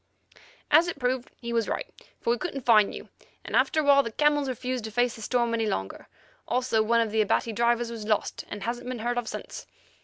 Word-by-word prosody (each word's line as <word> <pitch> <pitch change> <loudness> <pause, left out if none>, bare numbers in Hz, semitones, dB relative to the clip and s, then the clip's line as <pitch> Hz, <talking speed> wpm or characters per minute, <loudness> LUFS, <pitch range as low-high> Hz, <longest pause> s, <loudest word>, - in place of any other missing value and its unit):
"As 320 +4 +6
it 345 - -4
proved, 250 -1 -1
he 235 -1 -4
was 230 -2 +1
right, - - -2 0.3
for - - 0
we 240 - 0
couldn't 275 -8 -5
find 215 -4 +5
you, - - -10 0.4
and - - -3
after 310 - +3
awhile 285 -1 +6
the 230 - -5
camels 295 +1 +2
refused 255 -1 -3
to - - -4
face 245 +2 +1
the 225 - -11
storm 235 +1 0
any 225 -1 0
longer; 95 - -4 0.4
also 250 -3 +1
one 230 +2 +3
of 225 -2 -1
the 220 0 +2
Abati 215 +2 +1
drivers 235 +1 +1
was 220 -2 -7
lost, 215 -1 0
and 205 -1 -6
hasn't 240 +2 -4
been 255 - -3
heard 240 +2 -1
of 240 - -6
since. - - -7
235 Hz, 220 wpm, -27 LUFS, 225-255 Hz, 0.4 s, As